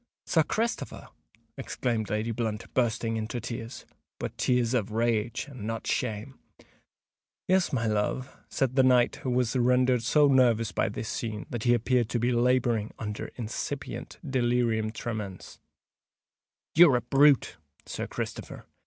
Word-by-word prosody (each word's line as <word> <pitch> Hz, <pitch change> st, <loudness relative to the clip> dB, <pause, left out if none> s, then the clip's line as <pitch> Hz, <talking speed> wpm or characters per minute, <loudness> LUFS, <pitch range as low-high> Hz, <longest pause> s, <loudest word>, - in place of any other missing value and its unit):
"Sir 160 Hz, -, +3 dB
Christopher!" 225 Hz, +9 st, -3 dB, 0.5 s
exclaimed 115 Hz, -5 st, -2 dB
Lady 110 Hz, +2 st, -1 dB
Blunt, 110 Hz, -1 st, -4 dB
bursting 115 Hz, -2 st, 0 dB
into 110 Hz, +2 st, -3 dB
tears—but 115 Hz, 0 st, -8 dB
tears 125 Hz, -1 st, +1 dB
of 115 Hz, -5 st, 0 dB
rage, 115 Hz, 0 st, 0 dB
and 125 Hz, -7 st, -8 dB
not 115 Hz, 0 st, -4 dB
shame. 120 Hz, +2 st, -2 dB, 1.1 s
"Yes, 185 Hz, -1 st, +3 dB
my 115 Hz, -4 st, 0 dB
love," 110 Hz, +4 st, -1 dB
said 130 Hz, -2 st, -1 dB
the 135 Hz, -, +6 dB
knight, 125 Hz, -2 st, +4 dB
who 130 Hz, -, -4 dB
was 125 Hz, -1 st, +1 dB
rendered 125 Hz, 0 st, +3 dB
so 145 Hz, +6 st, +4 dB
nervous 120 Hz, -5 st, +3 dB
by -, -, 0 dB
this 110 Hz, +1 st, -5 dB
scene 110 Hz, -2 st, -4 dB
that 120 Hz, -1 st, -4 dB
he 120 Hz, 0 st, +5 dB
appeared 120 Hz, 0 st, +1 dB
to 120 Hz, -, -1 dB
be 120 Hz, +2 st, +1 dB
labouring 120 Hz, -3 st, +2 dB
under 105 Hz, -1 st, -5 dB
incipient 125 Hz, +4 st, -5 dB
delirium 120 Hz, -4 st, +1 dB
tremens. 110 Hz, -5 st, -6 dB, 1.1 s
"You're 165 Hz, -5 st, +7 dB
a 120 Hz, -, +1 dB
brute, 135 Hz, -, +4 dB, 0.3 s
Sir -, -, -4 dB
Christopher!" -, -, -6 dB
120 Hz, 135 wpm, -28 LUFS, 110-130 Hz, 1.1 s, You're